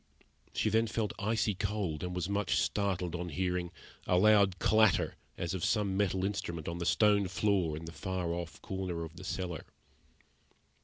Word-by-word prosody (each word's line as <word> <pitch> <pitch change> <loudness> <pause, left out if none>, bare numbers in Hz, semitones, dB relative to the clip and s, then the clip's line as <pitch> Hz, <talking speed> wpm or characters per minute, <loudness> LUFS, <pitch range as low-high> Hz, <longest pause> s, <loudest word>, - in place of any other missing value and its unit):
She 110 - 0
then 115 +2 +3
felt 110 -1 -1
icy 110 0 +1
cold, 100 -5 -2
and 90 0 -3
was 90 -1 -1
much 100 0 0
startled 95 -4 0
on 90 0 -3
hearing 90 +1 -1 0.4
a 90 - +3
loud 100 -2 +5
clatter 110 +1 +4 0.2
as 85 0 -2
of 95 - -3
some 100 -3 +1
metal 95 -2 +1
instrument 90 -5 -3
on 85 +1 -3
the 85 - -2
stone 105 -2 +4
floor 95 -5 +1
in 80 - -7
the 80 - -7
far 90 0 -3
off 85 -1 -5
corner 95 -3 -3
of 80 0 -8
the 90 - -10
cellar. 90 -2 -3
95 Hz, 170 wpm, -32 LUFS, 85-100 Hz, 0.4 s, loud